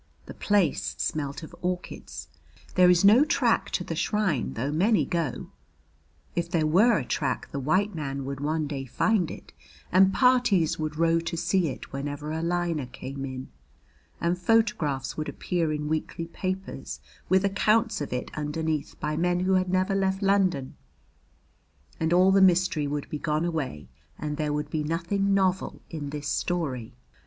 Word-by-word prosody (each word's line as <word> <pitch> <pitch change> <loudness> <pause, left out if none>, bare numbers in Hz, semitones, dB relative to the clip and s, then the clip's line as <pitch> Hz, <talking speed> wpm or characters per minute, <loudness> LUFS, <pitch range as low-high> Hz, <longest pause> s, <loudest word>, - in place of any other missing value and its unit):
The - - -9
place 200 -6 +1
smelt 145 0 -2
of 155 - -10
orchids. 180 0 -5 0.5
There 180 -1 +6
is 180 +2 +5
no 220 +7 +8
track 310 - +1
to - - -1
the - - -4
shrine 200 - 0
though 130 +6 -2
many 195 +8 +3
go. 165 -7 -3 0.8
If 170 0 -1
there 165 -3 +1
were 205 +10 +5
a 135 - -3
track 130 -2 -2
the 140 - -3
white 185 +10 +1
man 140 -4 -4
would 140 0 -5
one 155 +2 -1
day 140 -2 -4
find 180 - +1
it, - - -10 0.4
and 190 +1 +6
parties 245 - +3
would 155 -1 -3
row 165 0 +3
to 165 0 -4
see 175 +1 +1
it 130 - -7
whenever 145 +2 -4
a 160 +1 -2
liner 170 -4 -1
came 135 +2 -6
in; 130 -1 -7 0.7
and 175 +1 0
photographs 180 -10 +1
would 155 - -3
appear 170 -4 -1
in 150 0 -2
weekly 160 +2 -2
papers 185 +3 -5 0.3
with 190 +1 +4
accounts 215 +1 +2
of 145 - -4
it 125 0 -3
underneath 155 0 -3
by 150 0 -2
men 175 +2 +1
who 190 +1 +2
had 185 -1 +2
never 185 +2 +1
left 195 0 0
London, 190 -9 +1 1.2
and 160 0 0
all 185 +2 +5
the 195 0 +5
mystery 180 -5 +3
would 145 0 -3
be 150 - -3
gone 155 +2 0
away 140 - -3 0.3
and 150 -1 -4
there 150 -1 -1
would 150 0 -3
be 155 -2 -1
nothing 185 +5 0
novel 190 -1 0
in 150 -4 -5
this 145 0 -5
story. 140 -9 -2
165 Hz, 165 wpm, -27 LUFS, 150-185 Hz, 1.2 s, no